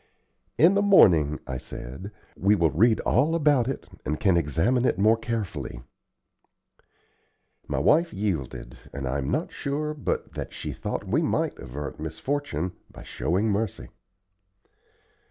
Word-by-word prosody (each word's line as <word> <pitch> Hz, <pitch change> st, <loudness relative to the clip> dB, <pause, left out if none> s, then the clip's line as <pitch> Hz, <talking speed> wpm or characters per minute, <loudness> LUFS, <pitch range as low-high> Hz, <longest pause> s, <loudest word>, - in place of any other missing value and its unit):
"In 170 Hz, +5 st, +6 dB
the 200 Hz, -, +3 dB
morning," 85 Hz, -, +5 dB
I 65 Hz, -1 st, -4 dB
said, 65 Hz, +12 st, -8 dB, 0.3 s
"we 100 Hz, +2 st, +3 dB
will 85 Hz, -5 st, +2 dB
read 110 Hz, -, +3 dB
all 150 Hz, +7 st, +2 dB
about 145 Hz, -6 st, +3 dB
it, 135 Hz, -, -4 dB, 0.2 s
and 75 Hz, +3 st, -2 dB
can 95 Hz, -4 st, +3 dB
examine 85 Hz, -, +1 dB
it 125 Hz, -, +1 dB
more 110 Hz, +3 st, +5 dB
carefully." 110 Hz, -, -4 dB, 1.8 s
My -, -, -2 dB
wife 170 Hz, +3 st, +3 dB
yielded, 85 Hz, -, -3 dB
and 70 Hz, -1 st, -5 dB
I 65 Hz, +3 st, -1 dB
am 65 Hz, -, -3 dB
not -, -, -1 dB
sure 150 Hz, +2 st, -3 dB
but 150 Hz, -, -3 dB
that -, -, -6 dB
she -, -, -5 dB
thought -, -, -4 dB
we -, -, +2 dB
might -, -, -1 dB
avert 70 Hz, +5 st, -7 dB
misfortune 90 Hz, -, -3 dB, 0.2 s
by -, -, -12 dB
showing 100 Hz, +7 st, -1 dB
mercy. 105 Hz, 0 st, -2 dB
100 Hz, 140 wpm, -26 LUFS, -, 1.8 s, In